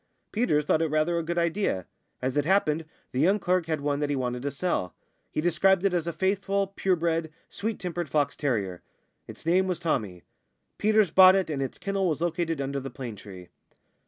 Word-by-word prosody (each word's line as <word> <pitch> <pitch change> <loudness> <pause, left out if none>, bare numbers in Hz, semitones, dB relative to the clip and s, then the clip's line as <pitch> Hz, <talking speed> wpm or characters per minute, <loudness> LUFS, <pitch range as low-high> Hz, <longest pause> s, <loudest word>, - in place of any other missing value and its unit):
Peters 180 -11 +1
thought 155 - +2
it 165 - +2
rather 155 +3 +1
a - - -3
good 170 +2 -3
idea. 170 - 0 0.4
As 130 0 -1
it 145 - +2
happened, 165 -3 +2 0.3
the 125 - -2
young 185 +8 +4
clerk 180 -3 0
had 155 -3 -1
one 145 0 0
that 145 -1 -1
he 145 - 0
wanted 125 -2 -2
to 140 - -2
sell; 140 - -2 0.3
he - - -2
described 175 +3 +3
it 195 - +2
as 170 -2 0
a - - 0
faithful, 195 +3 0
pure 190 -1 +2
bred, 165 -1 -1 0.2
sweet 220 +1 -3
tempered 175 -3 -4
fox 145 +1 +1
terrier. 100 - -2 0.5
It's - - -11
name 185 +3 +3
was 180 -2 -1
Tommy. 110 - -2 0.6
Peters 215 -4 +3
bought 185 0 +8
it, 190 -4 0
and 140 -2 -2
its 135 - -4
kennel 195 -2 -1
was 155 - -1
located 165 -2 -1
under 140 0 -2
the 135 0 -6
plane 125 -4 -7
tree. 95 -3 -11
165 Hz, 205 wpm, -27 LUFS, 140-185 Hz, 0.6 s, bought